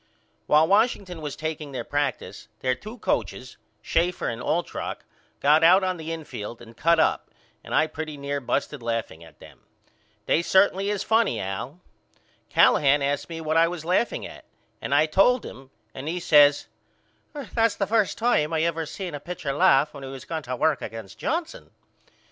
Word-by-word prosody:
While 155 +2 +5
Washington 200 -4 +1
was 150 -2 -5
takeing 155 -2 -5
their 130 - -4
practice 145 -2 -3
their 130 -1 +1
two 215 - -9
coachers 130 - -3 0.3
Schaefer 175 +2 0
and 115 +1 -5
Altrock 160 +7 -3 0.4
got 150 +3 +4
out 185 +4 +6
on 185 -1 -1
the 160 0 -6
infield 125 -9 -7
and 115 -1 -14
cut 165 +6 +3
up - - +1 0.3
and - - -4
I 155 - +4
pretty 155 -1 -6
near 140 0 -3
busted 140 +2 -2
laughing 115 -8 -4
at 80 -2 -17
them. - - -16 0.7
They 165 - +2
certainly 190 +2 +3
is 205 -2 -1
funny 225 0 +2
Al. 115 - -5 0.7
Callahan 140 0 +4
asked 140 +3 -1
me 165 -1 -6
what 155 0 0
was 170 -3 -7
I - - -6
laughing 190 +6 0
at - - -11 0.4
and - - -1
I 155 - +5
told 195 +11 +3
him 135 0 -11 0.2
and 135 +3 -7
he 175 +3 -2
says 145 -3 +5 0.9
That's 230 -2 +2
the 200 - -1
first 215 -1 +1
time 195 -10 +1
I 160 0 +1
ever 165 -1 -1
seen 185 -1 -6
a 145 - -5
pitcher 150 -2 -5
laugh 140 +1 +3
when 140 - -10
he 135 - -7
was 135 -1 -9
going 160 -1 -4
to 125 -2 -5
work 155 +2 +1
against 110 -4 -8
Johnson. 325 +2 -3
155 Hz, 175 wpm, -25 LUFS, 140-180 Hz, 0.9 s, out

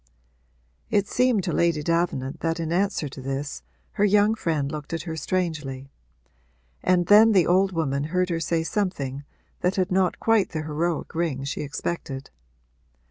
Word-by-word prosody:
It 205 -1 +2
seemed 250 -5 +2
to - - -2
Lady 170 -3 +1
Davenant 165 -5 -1
that 165 0 -1
in 165 -1 -2
answer 190 -3 0
to 135 0 -9
this 135 +2 -4 0.3
her 205 - 0
young 210 +1 +4
friend 155 -9 -1
looked 150 +1 -6
at 165 - -2
her 165 -2 -5
strangely; 150 -6 -3 0.9
and 180 -1 +2
then 215 +4 +7
the 185 -4 +5
old 190 +2 +3
woman 140 -5 -1
heard 180 +3 0
her 165 - 0
say 165 0 0
something 145 -8 -2 0.4
that 180 +2 0
had 185 -1 0
not 185 -1 +1
quite 225 -5 +2
the 155 -1 -2
heroic 155 +2 -2
ring 160 -5 -1
she 140 - -3
expected. 145 -2 -5
165 Hz, 160 wpm, -25 LUFS, 145-185 Hz, 0.9 s, then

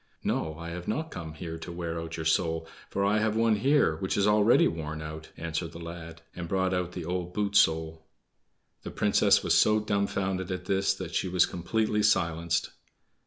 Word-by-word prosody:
"No, 80 -1 -1
I 85 0 -7
have 85 +1 -7
not 155 +8 -2
come 80 -2 -7
here 80 -1 -6
to 85 - -7
wear 85 -1 -4
out 80 0 -6
your 80 - -4
soul, 80 0 +1 0.2
for 100 - 0
I 105 +2 +3
have 110 0 0
one 115 -1 +3
here 135 - +3
which 95 +4 -2
is 100 - +3
already 105 +2 +5
worn 80 -1 -4
out," 80 0 -7
answered 85 +1 -4
the - - -8
lad, 85 -1 -9
and 85 -1 -5
brought 95 0 0
out 90 -1 -2
the 90 -3 -5
old 90 0 -3
boot 105 -1 -1
sole. 80 -2 +3 0.8
The - - -7
Princess - - +3
was - - +2
so 110 0 +5
dumfounded 100 -3 -1
at 90 -1 -4
this 95 +1 +1
that - - -7
she - - 0
was 90 -1 +4
completely 105 +4 -1
silenced. 85 -5 +1
90 Hz, 195 wpm, -28 LUFS, 80-100 Hz, 0.8 s, already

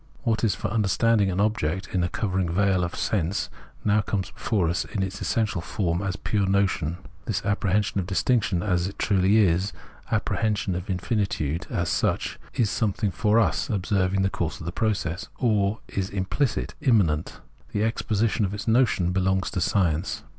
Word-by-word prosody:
What 115 -3 0
is 110 - +2
for - - -3
understanding 110 -1 +2
an 95 +1 -1
object 95 -4 0
in 90 -2 +2
a 90 - 0
covering 95 -4 -1
veil 95 +1 +2
of 90 - -3
sense, 95 -2 -1 0.3
now 105 0 +4
comes 100 -3 -2
before 100 -7 0
us 85 +3 0
in 100 -5 -3
its 95 +1 -5
essential 105 -6 0
form 85 -1 -1
as 95 -2 -2
a - - -7
pure 100 -3 0
notion. 95 -5 +1 0.3
This 100 -3 -2
apprehension 105 0 +1
of 90 - -3
distinction 100 -2 +1
as 90 -3 +1
it 100 - -8
truly 100 +1 +3
is, 95 -1 +3 0.4
the - - +1
apprehension 105 -3 0
of 90 +2 -5
in 95 - 0
finitude 90 -6 -1
as 85 0 -1
such, - - 0 0.2
is 110 -4 +2
something 105 -1 0
for 105 +5 +2
us 85 -11 +2
[observing 95 -1 +1
the 95 - +1
course 85 -3 -3
of - - -8
the 85 - -3
process], 95 -5 -1
or 105 -3 +1
is 95 -1 -3
implicit, 105 +6 -1
immanent. 100 - +2 0.3
The 105 - 0
exposition 110 -1 0
of 100 0 -1
its 105 +4 -6
notion 110 -7 +3
belongs 95 0 +1
to 90 - -2
science. 85 -2 0
100 Hz, 180 wpm, -25 LUFS, 90-105 Hz, 0.4 s, now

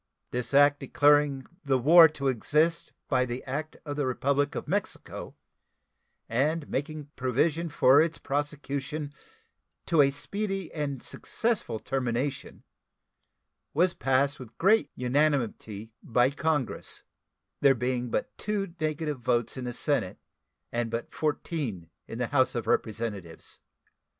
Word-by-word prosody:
This 125 0 -2
act 145 0 +6
declaring 145 -2 +3 0.2
"the 135 -2 +2
war 160 +6 +8
to 140 -2 -3
exist 150 +7 +1 0.2
by 130 -3 +2
the 125 0 -4
act 150 +4 -4
of 145 -1 -4
the 145 -3 0
Republic 140 +3 0
of - - -4
Mexico," - - -3 0.9
and 145 +6 0
making 145 +1 -4
provision 150 +6 0
for 145 -1 +5
its 165 0 0
prosecution 145 +1 -3 0.7
"to 165 -4 +4
a 140 - +5
speedy 195 +5 -3
and 145 -4 -3
successful 225 - -1
termination," 130 +2 -3 1.1
was 175 +3 +3
passed 135 +3 +1
with 125 -4 -11
great 215 +5 +4
unanimity 125 -5 0
by 125 +3 +2
Congress, 145 -3 -2 0.6
there 135 -1 +5
being 125 0 -1
but - - -2
two 200 -4 -2
negative 155 -2 -2
votes 120 -1 0
in 130 -1 -5
the 125 - -3 0.2
Senate 140 -11 +1 0.5
and 120 -1 -1
but 115 +1 -4
fourteen 140 - -3 0.2
in 115 - -7
the 125 - 0
House 130 0 +2
of 120 - -2
Representatives. 105 -6 -3
140 Hz, 125 wpm, -28 LUFS, 125-155 Hz, 1.1 s, war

